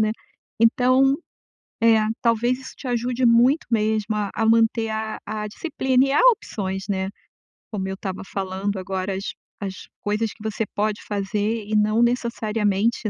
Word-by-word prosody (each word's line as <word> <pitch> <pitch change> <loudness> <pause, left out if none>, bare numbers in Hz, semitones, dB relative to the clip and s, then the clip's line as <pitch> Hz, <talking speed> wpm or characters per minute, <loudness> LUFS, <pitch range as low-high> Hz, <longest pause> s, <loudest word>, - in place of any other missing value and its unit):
né. 215 0 +3 0.5
Então, 255 +3 +4 0.7
é, 225 -1 +6 0.2
talvez 240 +2 +2
isso 260 - -10
te 265 - -7
ajude 245 +1 0
muito 245 +6 +5
mesmo 215 -1 +1
a 205 -1 -1
a 225 - 0
manter 225 0 +3
a 220 0 -3
a 210 0 -3
disciplina 265 0 +1
e - - -1
há - - +4
opções, 195 - -4
né. 190 0 -1 0.6
Como 190 -2 -2
eu 190 - -3
estava 190 -1 -5
falando 195 +1 -3
agora, 190 +1 -3
as 195 - -4 0.3
as 195 -1 -3 0.3
coisas 210 +1 -1
que 215 - -15
você 220 0 -2
pode 210 0 0
fazer 205 +2 -1
e 215 - -4
não 215 +2 +3
necessariamente, 225 -2 0
220 Hz, 155 wpm, -23 LUFS, 205-235 Hz, 0.7 s, é